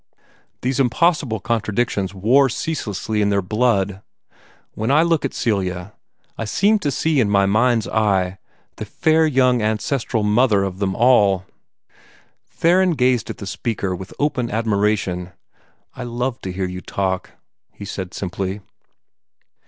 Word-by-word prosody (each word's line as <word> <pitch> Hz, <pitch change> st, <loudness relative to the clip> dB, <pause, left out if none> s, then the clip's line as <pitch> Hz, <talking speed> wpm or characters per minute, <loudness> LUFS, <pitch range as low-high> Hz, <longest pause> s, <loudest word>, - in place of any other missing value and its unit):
These 130 Hz, +2 st, 0 dB
impossible 135 Hz, -3 st, +1 dB
contradictions 110 Hz, -3 st, -1 dB
war 120 Hz, +8 st, +3 dB
ceaselessly 110 Hz, -, -3 dB
in 100 Hz, -, +2 dB
their 100 Hz, -1 st, +2 dB
blood. 100 Hz, -2 st, 0 dB, 0.7 s
When 110 Hz, -, -3 dB
I 150 Hz, +4 st, +5 dB
look 165 Hz, -2 st, +1 dB
at 135 Hz, -, -3 dB
Celia, 95 Hz, -3 st, -2 dB, 0.5 s
I -, -, -1 dB
seem 205 Hz, -, +2 dB
to 145 Hz, -, -1 dB
see 150 Hz, +2 st, +1 dB
in 110 Hz, -5 st, +2 dB
my 100 Hz, -1 st, +3 dB
mind's 110 Hz, +2 st, +2 dB
eye 95 Hz, -4 st, 0 dB, 0.4 s
the -, -, -5 dB
fair 160 Hz, 0 st, +2 dB
young 125 Hz, -4 st, +3 dB
ancestral 110 Hz, +2 st, -1 dB
mother 105 Hz, -1 st, +3 dB
of 95 Hz, -1 st, -4 dB
them 95 Hz, -2 st, -1 dB
all." 105 Hz, -6 st, +4 dB, 1.0 s
Theron 180 Hz, +2 st, +3 dB
gazed 125 Hz, -5 st, +1 dB
at 115 Hz, -, -5 dB
the 100 Hz, -, -7 dB
speaker 100 Hz, -2 st, -3 dB
with 95 Hz, +1 st, -9 dB
open 130 Hz, -5 st, 0 dB
admiration. 100 Hz, -5 st, -1 dB, 0.6 s
"I -, -, -9 dB
love 125 Hz, +1 st, -3 dB
to 95 Hz, -, -5 dB
hear 95 Hz, +1 st, -2 dB
you 90 Hz, 0 st, -6 dB
talk," 95 Hz, -1 st, -3 dB, 0.4 s
he 100 Hz, -, -10 dB
said 95 Hz, -2 st, -6 dB
simply. 95 Hz, +1 st, -4 dB
110 Hz, 140 wpm, -20 LUFS, 95-125 Hz, 1.0 s, I